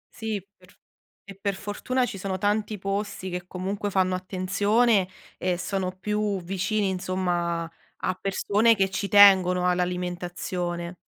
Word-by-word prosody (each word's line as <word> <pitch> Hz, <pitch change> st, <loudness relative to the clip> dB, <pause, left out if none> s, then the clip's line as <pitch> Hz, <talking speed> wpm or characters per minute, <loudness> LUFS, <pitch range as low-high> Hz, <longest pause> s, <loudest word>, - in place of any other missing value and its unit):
Sì, 220 Hz, -2 st, -3 dB, 0.2 s
pr 180 Hz, +2 st, -21 dB, 0.5 s
e 195 Hz, 0 st, -10 dB
per 200 Hz, -1 st, -1 dB
fortuna, 210 Hz, +6 st, -1 dB
ci 200 Hz, -, -6 dB
sono 190 Hz, 0 st, -2 dB
tanti 210 Hz, +2 st, 0 dB
posti 195 Hz, -1 st, -3 dB
che, 180 Hz, 0 st, -5 dB
comunque, 195 Hz, +3 st, -3 dB
fanno 185 Hz, -1 st, +1 dB
attenzione 195 Hz, +3 st, +2 dB, 0.3 s
e 180 Hz, -1 st, 0 dB
sono 185 Hz, 0 st, -2 dB
più 210 Hz, 0 st, -1 dB
vicini, 195 Hz, +3 st, -1 dB
insomma, 180 Hz, -2 st, -1 dB, 0.3 s
a -, -, -1 dB
persone 210 Hz, +3 st, +3 dB
che 195 Hz, -1 st, +1 dB
ci 200 Hz, +1 st, -2 dB
tengono 185 Hz, -3 st, +6 dB
all'alimentazione. 180 Hz, -1 st, -2 dB
190 Hz, 130 wpm, -26 LUFS, 180-205 Hz, 0.5 s, tengono